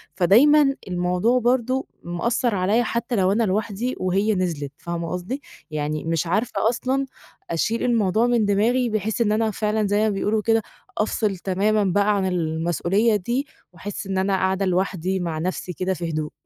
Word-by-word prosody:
فدايمًا 275 - +5
الموضوع 180 +7 +1
برضه 255 +2 +1 0.2
مأثر 230 +7 -1
عليّا، 200 +6 +2
حتّى 235 +1 -2
لو 190 -1 +2
أنا 230 +3 +2
لوحدي، 215 +4 -1
وهي 195 +4 +1
نزلِت، 165 -7 -2
فاهمة 170 -1 -4
قصدي؟ 185 +11 -4 0.3
يعني 150 0 -2
مش 165 0 -1
عارفة 215 +4 +1
أصلًا 260 +3 -1 0.4
أشيل 220 +8 0
الموضوع 225 -1 +2
من 240 -3 +2
دماغي، 235 +5 +2
بحيث 215 +1 -1
إن 210 -2 +2
أنا 220 0 +1
فعلًا 210 0 0
زي 205 - +1
ما 215 0 +2
بيقولوا 210 +2 0
كده 225 +1 +2 0.4
أفصل 210 -2 0
تمامًا 205 +4 +1
بقى 200 +2 +2
عن 195 - 0
المسؤوليّة 175 - +1
دي، 240 +9 -1 0.3
وأحس 195 +3 -6
إن 190 -1 -2
أنا 190 +1 +1
قاعدة 190 +1 0
لوحدي 185 0 0
مع 165 -3 -3
نفْسي 180 +1 -3
كده 185 +3 -1
في 170 -2 -4
هدوء. 155 -1 -3
200 Hz, 165 wpm, -23 LUFS, 180-225 Hz, 0.4 s, فدايمًا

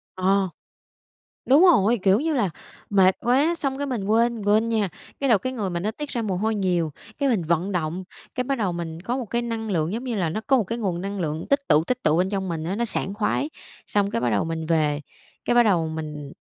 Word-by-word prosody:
Ờ, 190 0 +2 1.0
đúng 275 +5 +6
rồi, 240 - +5
kiểu 195 +2 +5
như 315 +3 0
là, 220 -10 +1 0.4
mệt 190 -2 +5
quá, 275 +8 +3
xong 270 -3 -2
cái 285 - -2
mình 240 -7 -2
quên, 230 +3 +3
mình 215 - -6
quên 215 +3 +3
nha. 215 -4 +1 0.3
Cái 275 - +1
rồi 220 -5 +5
cái 255 +5 -3
người 210 -6 -2
mình 170 -1 -3
nó 215 - 0
tiết 295 +5 -6
ra 235 - -2
mồ 195 -4 -1
hôi 220 +4 0
nhiều, 175 -5 0 0.3
cái 280 -1 +1
mình 215 -8 +1
vận 170 +4 0
động, 175 +1 -2 0.3
cái 250 - 0
bắt 275 +1 -1
đầu 200 -6 0
mình 165 -1 -5
có 240 +7 -2
một 255 - -3
cái 235 +3 -1
năng 225 -2 -3
lượng, 165 -2 0
giống 230 +5 -3
như 245 -3 -3
là, 180 -5 0
nó 215 +7 -3
có 270 - +5
một 230 - +2
cái 230 +5 -4
nguồn 185 -6 -2
năng 200 +1 -4
lượng 160 -2 -2
tích 280 - +4
tụ, 150 +1 +4
tích 250 +7 -2
tụ 155 +2 +3
bên 185 +2 +2
trong 195 -2 -2
mình 160 -2 -3
á 180 +4 -2
nó 235 +2 0
sảng 195 -2 -2
khoái. 230 +7 0 0.4
Xong 200 -1 +1
cái 115 - -1
bắt 120 - +1
đầu 105 +4 +1
mình 165 -1 -3
về, 155 -2 +1 0.4
cái 240 - +2
bắt 240 - +7
đầu 175 -7 +2
mình 150 -3 -6
200 Hz, 255 wpm, -24 LUFS, 170-235 Hz, 1.0 s, bắt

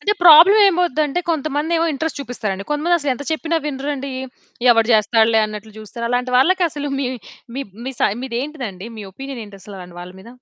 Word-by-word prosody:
అంటే 415 - +2
ప్రాబ్లమ్ 350 +6 +8
ఏమౌదంటే, 335 -3 0
కొంతమందేమో 315 +2 -1
ఇంట్రెస్ట్ 315 +2 -3
చూపిస్తారండి, 210 -7 -4
కొంతమంది 325 +4 +1
అసలు 290 -4 -2
ఎంత 280 - -8
చెప్పినా 325 +1 -1
వినరండి. 275 -1 -4 0.6
ఎవడు 225 -1 +3
చేస్తాడులే 220 +1 +3
అన్నట్లు 215 0 -9
చూస్తారు. 220 +2 -8
అలాంటి 250 +1 -1
వాళ్ళకసలు 300 -1 +1
మీ 275 - -1 0.5
మీ 275 - -2 0.2
మీ 265 - -3
సై 200 - +3
మీదేంటిది 265 +2 -4
అండి? 190 +4 -10
మీ 210 - -7
ఒపీనియన్ 270 +3 -8
ఏంటి 200 -1 -13
అసలు. 200 +1 -11
అలాంటి 175 -1 -11
వాళ్ళ 180 +1 -10
మీద? 195 - -14
270 Hz, 175 wpm, -19 LUFS, 220-310 Hz, 0.6 s, ప్రాబ్లమ్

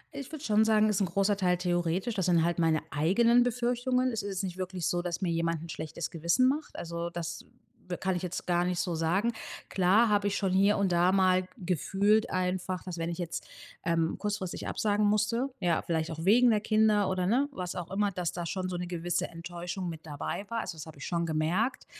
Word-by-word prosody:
Ich 280 +1 -7
würde 310 -1 -7
schon 215 0 +4
sagen, 215 -1 +4
ist 210 -1 +1
'n 195 - +2
großer 195 +4 +1
Teil 180 -2 +2
theoretisch. 175 +4 0
Das 190 -4 -1
sind 170 -2 +4
halt 175 0 0
meine 160 -2 +2
eigenen 230 +11 +4
Befürchtungen. 245 +1 +1
Es 225 -1 -2
ist 205 - -5
jetzt 195 0 -3
nicht 185 -1 -4
wirklich 185 -2 -4
so, 175 - +1
dass 175 +1 -3
mir 180 -3 0
jemand 165 -1 -1
'n 165 - -9
schlechtes 155 +1 -5
Gewissen 170 +10 +2
macht. 295 +4 -2
Also, 170 0 -4
das 170 -1 -5 0.4
w 180 -1 -4
kann 190 -1 -1
ich 175 - -3
jetzt 180 0 -4
gar 175 -1 +2
nicht 180 -1 -1
so 175 -1 -1
sagen. 185 +9 +1 0.3
Klar 195 +5 +4
habe 205 -1 +2
ich 200 - 0
schon 195 -3 0
hier 200 +2 +4
und 195 -3 +1
da 175 +2 +4
mal 185 -1 +3
gefühlt 200 - +1
einfach, 185 0 -1
dass, 180 -2 -5
wenn 165 0 -2
ich 170 - -4
jetzt, 170 -2 -4 0.4
ähm, 165 -1 0
kurzfristig 205 -4 -3
absagen 210 0 +1
musste, 215 +5 +1
ja, 175 -3 +1
vielleicht 160 -1 -1
auch 160 0 -5
wegen 235 +6 +5
der 215 -2 +3
Kinder 215 -2 +3
oder, 185 -1 0
ne, 265 +8 +2
was 180 -8 -5
auch 175 -1 -6
immer, 205 +1 +1
dass 180 -3 -2
da 175 -1 -5
schon 185 +2 -3
so 180 - -3
'ne 175 0 -4
gewisse 175 0 -2
Enttäuschung 175 +2 -6
mit 160 -1 -8
dabei 150 +6 -4
war. 230 +1 -2
Also, 175 -3 -6
das 150 - -7
habe 160 -2 -12
ich - - -6
schon 170 -1 -1
gemerkt, 170 +11 0
185 Hz, 225 wpm, -29 LUFS, 170-210 Hz, 0.4 s, wegen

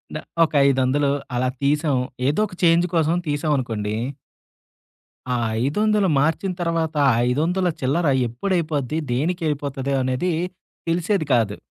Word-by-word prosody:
న - - -1 0.3
ఒక 155 - -9
500 135 +2 +2 0.3
అలా 130 +1 +1
తీసాం. 145 0 +1 0.3
ఏదొక 195 +6 0
చేంజ్ 170 0 +4
కోసం 165 0 +2
తీసామనుకోండి. 130 -8 -1 1.4
ఆ - - +1 0.3
500 210 +6 +2
మార్చిన 165 +6 0
తర్వాత 165 -2 -1 0.3
500 170 +8 +1
చిల్లర 145 +5 +1 0.2
ఎప్పుడైపోద్ది 155 - -1
దేనికైపోతది 140 -2 -1
అనేది 130 +8 0 0.6
తెలిసేది 175 0 0
కాదు. 110 -4 +1
150 Hz, 105 wpm, -22 LUFS, 135-170 Hz, 1.4 s, చేంజ్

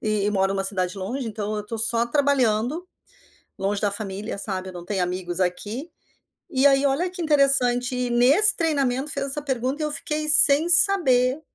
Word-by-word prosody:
e 215 -2 -2
e 210 - 0
moro 195 -1 -1
numa 195 - -2
cidade 185 -1 -3
longe, 240 +7 -6
então 215 -1 -5
eu 210 0 -7
tô 225 - -6
só 230 +1 +1
trabalhando, 275 +3 -1 0.7
longe 200 +1 -2
da 205 - -1
família, 200 0 -6
sabe. 190 -2 -5
Eu - - -14
não 175 -1 -10
tenho 195 -3 -2
amigos 180 -1 -5
aqui. 210 - -4 0.6
E 265 +1 +1
aí, 275 0 +3
olha 280 +7 -1
que 365 -2 -7
interessante, 270 -5 +3
e 250 -1 -3
nesse 280 - +4
treinamento 280 -4 -2
fez 275 -1 -3
essa 280 +1 -2
pergunta, 265 +2 -4
e - - -1
eu 300 - -5
fiquei 305 +1 -3
sem 300 +1 +6
saber 310 -8 +3
245 Hz, 185 wpm, -22 LUFS, 205-285 Hz, 0.7 s, sem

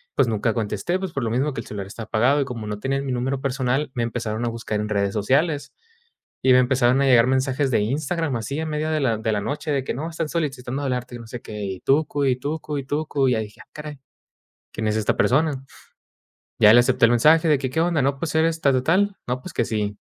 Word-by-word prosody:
pues, - - +3
nunca 110 0 0
contesté, 115 - -1
pues, 190 -3 -4
por 135 - -2
lo 115 - -1
mismo 135 +5 0
que 115 - -4
el - - -13
celular 100 -2 -5
está 110 +3 -8
apagado, 120 +7 +2
y - - 0
como 120 -5 -6
no 105 -1 -4
tenían 135 +3 -2
mi 130 - -2
número 130 +2 -2
personal, 135 +1 -1
me 120 - -1
empezaron 115 -1 -3
a 120 - 0
buscar 115 -2 -3
en 105 - -4
redes 100 -2 0
sociales, 145 - +1 0.7
y 130 - +5
me - - +7
empezaron 125 0 +3
a 140 - +3
llegar 125 -2 +5
mensajes 130 +1 +1
de 110 - +2
Instagram, 150 +5 -1
así 140 +7 -4
en 160 0 -3
medio 155 +1 -2
de 155 -1 0
la 115 -5 +1
de 110 0 -1
la 105 - 0
noche 150 +7 -4
de 140 -2 0
que: - - -3
"No, 155 +6 -4
están 165 -2 -3
solicitando 135 -5 -3
hablarte, 125 -2 -3
y - - -8
no 115 - -11
sé 120 +1 -7
qué, 105 -1 -6
y 95 -2 -5
tucu, 145 0 +1
y 130 -2 +2
tucu, 150 +2 -4
y 135 - -7
tucu", 145 -1 0
y - - +3
ya 110 - 0
dije: 105 -1 -7
"Ah, - - -37
caray, 150 -2 -8 0.7
¿quién 110 - -3
es 105 - 0
esta 110 -2 0
persona?", 140 0 +1 1.0
ya 110 -1 +8
le 120 - +8
acepto, 120 - +3
el 115 - +3
mensaje 155 +7 +5
de 150 - +4
que: 130 -1 -2
"¿Qué 160 - -2
onda?, 170 -3 +1
no, 135 +1 0
pues, 160 +1 -3
¿eres 165 +1 +2
tal 140 -2 +3
o 125 - -1
tal?, 195 +6 +2
no, 125 +1 -2
pues - - -9
que - - +1
sí, 105 -2 -2
130 Hz, 255 wpm, -23 LUFS, 115-150 Hz, 1.0 s, ya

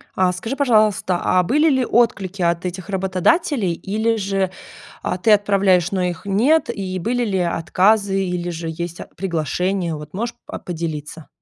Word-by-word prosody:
А 185 -1 +3
скажи, 225 +9 -4
пожалуйста, 215 -9 +2
а 185 0 +3
были 300 - +3
ли 260 -3 +2
отклики 200 -5 +1
от 170 +1 +1
этих 180 +2 -5
работодателей, 190 - +1
или 220 +6 -1
же, 195 -2 -1 0.5
а, 180 - -1
ты 215 +4 +2
отправляешь, 200 -4 +3
но 190 - 0
их 175 0 -3
нет, 235 +12 +2
и 185 -2 -4
были 245 +6 0
ли 195 -3 -1
отказы, 195 +3 +2
или 175 -1 -3
же 165 -1 -5
есть 170 +1 -5
ат - - -10
приглашения? 180 0 -1
Вот 150 0 -10
можешь, 230 +5 -3
а, - - -6
поделиться? 160 -2 -6
190 Hz, 165 wpm, -20 LUFS, 175-215 Hz, 0.5 s, А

